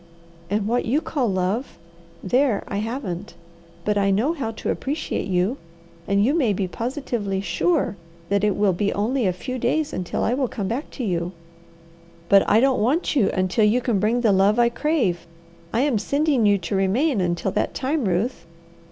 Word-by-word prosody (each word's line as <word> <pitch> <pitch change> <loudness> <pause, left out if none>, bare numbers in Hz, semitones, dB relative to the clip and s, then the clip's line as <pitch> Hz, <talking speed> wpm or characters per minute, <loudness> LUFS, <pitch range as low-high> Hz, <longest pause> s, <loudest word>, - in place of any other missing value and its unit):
"And 205 +1 0
what 240 +2 0
you 260 +6 +2
call 280 -6 -1
love 190 +6 -1 0.5
there 245 +1 +2
I 200 - -3
haven't. 210 -4 -4 0.5
But 210 -1 +1
I 200 0 +2
know 220 +11 +2
how 275 -9 -3
to 225 - -3
appreciate 295 +4 -3
you, 190 +7 0 0.5
and 200 +1 +3
you 275 - +2
may 265 -11 +2
be 195 -1 -1
positively 230 -3 -3
sure 285 - 0 0.3
that 200 0 +1
it 210 -2 +2
will 205 -2 +2
be 200 +3 0
only 230 +3 0
a - - +2
few 255 +8 -5
days 290 +6 0
until 180 -1 -2
I 230 - +1
will 260 0 0
come 205 -4 -4
back 245 +9 -3
to 260 - -3
you." 175 -3 -2 1.0
"But 200 0 +5
I 220 - +5
don't 265 -1 +2
want 290 +9 +1
you 225 -9 +3
until 185 +3 +1
you 220 +4 +3
can 235 -5 0
bring 225 +5 +1
the 225 -3 +3
love 195 +3 +3
I 240 0 +4
crave. 235 - 0 0.4
I 230 - +1
am 270 -6 +2
sending 280 -3 +1
you 205 0 +4
to 185 +1 -4
remain 205 +6 +1
until 175 +2 -1
that - - -1
time, 280 0 -1
Ruth." 185 0 -1
220 Hz, 185 wpm, -23 LUFS, 195-260 Hz, 1.0 s, But